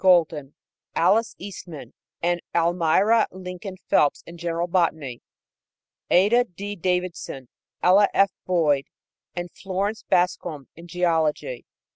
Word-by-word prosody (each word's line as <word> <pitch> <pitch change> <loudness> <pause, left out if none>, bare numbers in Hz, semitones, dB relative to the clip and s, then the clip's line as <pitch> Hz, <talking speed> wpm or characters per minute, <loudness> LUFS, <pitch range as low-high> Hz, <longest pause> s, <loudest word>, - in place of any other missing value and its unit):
Golden, 160 -6 +3 0.4
Alice 210 +7 +3
Eastman 180 -5 -9 0.3
and 175 0 +1
Almira 175 +6 +3
Lincoln 185 +1 -8
Phelps 145 - +3
in 170 0 -11
general 170 0 -1
botany; 160 -8 0 0.9
Ada 220 +7 +4
D. 200 +1 -7
Davidson, 180 -8 -3 0.3
Ella 195 +3 +6
F. 195 0 +3 0.2
Boyd 155 -6 +2 0.5
and 175 -1 -4
Florence 200 +3 -3
Bascom 175 - 0
in 170 +1 -12
geology. 170 - 0
175 Hz, 105 wpm, -24 LUFS, 165-190 Hz, 0.9 s, Ella